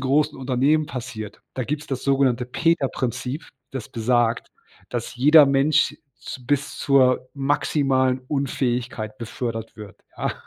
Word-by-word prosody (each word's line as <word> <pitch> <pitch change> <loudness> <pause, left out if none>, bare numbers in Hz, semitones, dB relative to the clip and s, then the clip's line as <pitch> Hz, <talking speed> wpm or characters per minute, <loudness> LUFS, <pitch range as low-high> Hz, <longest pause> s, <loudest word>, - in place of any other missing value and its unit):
großen 140 +3 +1
Unternehmen 135 +4 +2
passiert. 110 -6 -7
Da 130 - -2
gibt's 150 +5 -3
das 135 -2 -4
sogenannte 135 -3 +2
Peter-Prinzip, 135 -1 -1 0.2
das 130 -5 -6
besagt, 120 0 +1 0.4
dass - - -4
jeder 145 +4 +7
Mensch 140 +2 +2 0.2
z 125 -2 -9
bis 140 +1 0
zur 130 -2 +3
maximalen 135 -2 +1
Unfähigkeit 125 -6 -2
befördert 115 -1 -5
wird, 105 -3 -10 0.2
ja? - - -1
130 Hz, 120 wpm, -23 LUFS, 120-140 Hz, 0.4 s, jeder